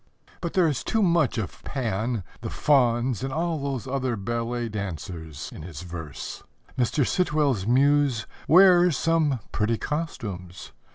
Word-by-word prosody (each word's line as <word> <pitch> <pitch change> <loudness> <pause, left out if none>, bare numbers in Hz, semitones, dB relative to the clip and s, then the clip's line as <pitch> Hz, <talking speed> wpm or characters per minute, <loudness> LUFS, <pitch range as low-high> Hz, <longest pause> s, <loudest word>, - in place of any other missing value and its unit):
But 170 - -3
there 180 -3 +4
is 145 -5 -1
too 220 -1 +1
much 170 - +2
of 105 -5 -5
Pan, 115 -3 -2 0.2
the - - -4
fauns 125 -5 +2
and 135 - -2
all 165 +2 -1
those 135 -3 -3
other 130 -2 -1
ballet 115 +3 -2
dancers 80 -7 -6
in - - -9
his 80 -1 -8
verse. 80 -5 -7 0.3
Mr. 130 +2 +1
Sitwell's 145 - +1
muse 135 -2 +3 0.2
wears 175 -2 +6
some 155 -7 +1
pretty 110 +2 0
costumes. 100 - -5
125 Hz, 135 wpm, -25 LUFS, 105-150 Hz, 0.3 s, wears